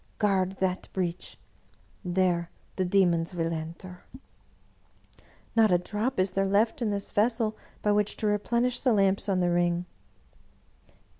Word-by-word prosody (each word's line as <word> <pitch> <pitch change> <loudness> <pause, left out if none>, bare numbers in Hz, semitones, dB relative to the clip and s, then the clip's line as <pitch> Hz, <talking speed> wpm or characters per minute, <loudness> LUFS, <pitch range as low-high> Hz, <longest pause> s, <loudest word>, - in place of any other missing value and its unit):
Guard 190 -3 +1
that 190 -1 -2
breach 180 -2 -3 0.4
— 185 - -17
^there 175 -2 +2 0.3
the 185 - 0
demons 180 -2 +2
will 165 -1 -1
enter." 170 +3 -7 0.7
" - - -31
Not 225 -1 +5
a 180 - +4
drop 210 +6 -3
is 185 0 +2
there 195 +1 0
left 215 +5 +1
in 230 - +1
this 200 -1 -3
vessel 220 0 +1 0.3
by 210 - +3
which 205 0 +1
to - - -3
re 210 0 +2
plenish 240 +3 0
the 250 - +3
lamps 195 0 +2
on 185 -2 +1
the 175 -1 +2
ring." 175 0 +1
195 Hz, 155 wpm, -27 LUFS, 180-210 Hz, 0.7 s, Not